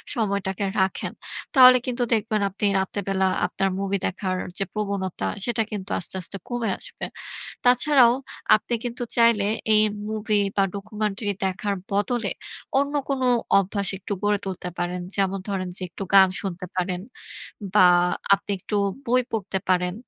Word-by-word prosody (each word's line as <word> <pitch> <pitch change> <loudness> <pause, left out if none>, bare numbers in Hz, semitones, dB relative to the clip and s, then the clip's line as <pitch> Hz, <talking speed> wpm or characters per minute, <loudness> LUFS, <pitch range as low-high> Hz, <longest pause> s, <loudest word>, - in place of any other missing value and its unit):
সময়টাকে 200 -4 -1 0.2
রাখেন, 190 0 0 0.4
তাহলে 255 -1 +9
কিন্তু 250 -1 -1
দেখবেন 215 -1 0
আপনি 200 +2 -3
রাত্রে 190 +2 -2
বেলা, 190 -1 +2 0.2
আপনার 195 +2 -1
মুভি 200 0 0
দেখার 185 0 -2 0.2
যে - - +1
প্রবণতা, 200 -3 -2 0.2
সেটা 240 -1 0
কিন্তু 200 -2 -5
আস্তে, 175 - -9
আস্তে 190 +3 -7
কমে 240 -3 -1
আসবে। - - -7 0.6
তাছাড়াও 250 0 +5 0.4
আপনি 215 - -8
কিন্তু 245 0 -4
চাইলে, 230 -3 +4 0.3
এই 215 - +6 0.3
মুভি 215 -1 0 0.2
বা 200 - +4
ডকুমেন্টারি 210 0 -3
দেখার 195 +2 -1 0.2
বদলে, 205 +4 0 0.5
অন্য 280 +1 0
কোন 275 -2 -1 0.4
অভ্যাস, 200 0 -1
একটু 200 - -6
গড়ে 205 0 +2
তুলতে 185 -2 -5
পারেন। 175 +1 -2 0.2
যেমন 195 -1 +1
ধরেন 190 -2 -2
যে, - - -4
একটু 170 - -8
গান 190 -1 +9
শুনতে 180 -1 -5
পারেন। 180 0 -1 0.7
বা 210 - +5 0.5
আপনি 200 +1 -1
একটু 210 - -4 0.3
বই 250 +2 +3
পড়তে 200 -3 -2
পারেন 180 -1 +2
200 Hz, 145 wpm, -24 LUFS, 190-225 Hz, 0.7 s, তাহলে